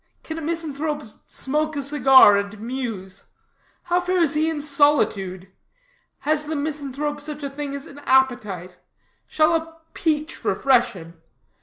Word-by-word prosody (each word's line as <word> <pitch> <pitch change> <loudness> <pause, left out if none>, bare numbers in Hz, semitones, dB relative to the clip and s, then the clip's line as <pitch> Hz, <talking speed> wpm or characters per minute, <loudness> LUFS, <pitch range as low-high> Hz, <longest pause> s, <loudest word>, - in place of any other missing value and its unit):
Can 320 0 -6
a - - -7
misanthrope 305 -2 -3 0.2
smoke 305 +3 -2
a 285 - -2
cigar 265 -6 +7
and 200 +1 -3
muse? 225 -6 -6 0.6
How 355 +1 +1
fares 355 -4 +1
he 310 +1 +1
in 320 -2 -3
solitude? 275 - +1 0.7
Has 305 0 +1
the 310 +1 -3
misanthrope 290 0 -3
such 300 0 -6
a 280 - -4
thing 280 0 -5
as 280 - -7
an 285 - -12
appetite? 210 -9 +1 0.5
Shall 310 +1 +2
a 325 0 -2 0.2
peach 310 0 -2
refresh 255 -3 +2
him? 165 -3 -12
285 Hz, 140 wpm, -23 LUFS, 245-310 Hz, 0.7 s, cigar